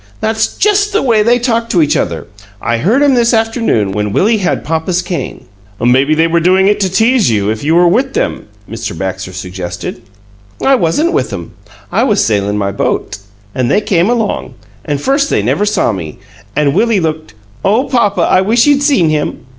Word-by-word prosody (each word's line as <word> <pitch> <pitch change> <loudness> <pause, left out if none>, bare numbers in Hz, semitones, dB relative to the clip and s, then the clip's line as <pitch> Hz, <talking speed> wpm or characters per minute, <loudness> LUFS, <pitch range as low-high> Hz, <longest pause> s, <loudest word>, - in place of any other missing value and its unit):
"That's 220 0 -1
just 415 0 +2
the 420 - +2
way 230 -5 +3
they 235 +3 +3
talked 230 -1 -1
to 175 - +3
each 145 - +1
other. 85 -2 -2 0.3
I 115 +2 -1
heard 225 - +2
'em 285 -2 +4
this 240 -1 +2
afternoon, 225 - 0
when 105 +1 -2
Willie 215 - +2
had 180 -2 -1
papa's 165 +3 -1
cane." 175 -7 -5 0.3
"Maybe 130 +6 +2
they 160 +1 +3
were 165 +1 +1
doing 185 +3 +3
it 205 - +2
to 195 -2 +1
tease 225 - +2
you, 105 -2 0
if 110 +3 -5
you 160 +3 +1
were 175 0 +5
with 260 +9 +1
them," - - -2 0.2
Mr. 110 -4 -6
Baxter 95 +1 -4
suggested. 90 +2 -6 0.6
"I 275 - +2
wasn't 265 - +1
with - - -1
'em. - - -7 0.4
I - - +1
was 205 -1 +2
sailin' 105 -1 0
my 100 -1 -1
boat, 100 - -2 0.4
an' 130 -2 -1
they 205 - +2
came 190 -2 +1
along, 225 - -2 0.3
an' 145 - -1
first 275 - 0
they - - 0
never 210 - 0
saw 205 - +1
me, 85 -7 -6 0.4
an' 145 -2 +1
Willie 230 +1 +2
looked 155 - -4 0.3
oh, 220 +6 +2
papa, 235 -7 0
I 185 - +3
wish 230 +5 +2
you'd 285 -1 +3
seen 275 - +2
him!" 150 -4 -2
180 Hz, 195 wpm, -13 LUFS, -, 0.6 s, were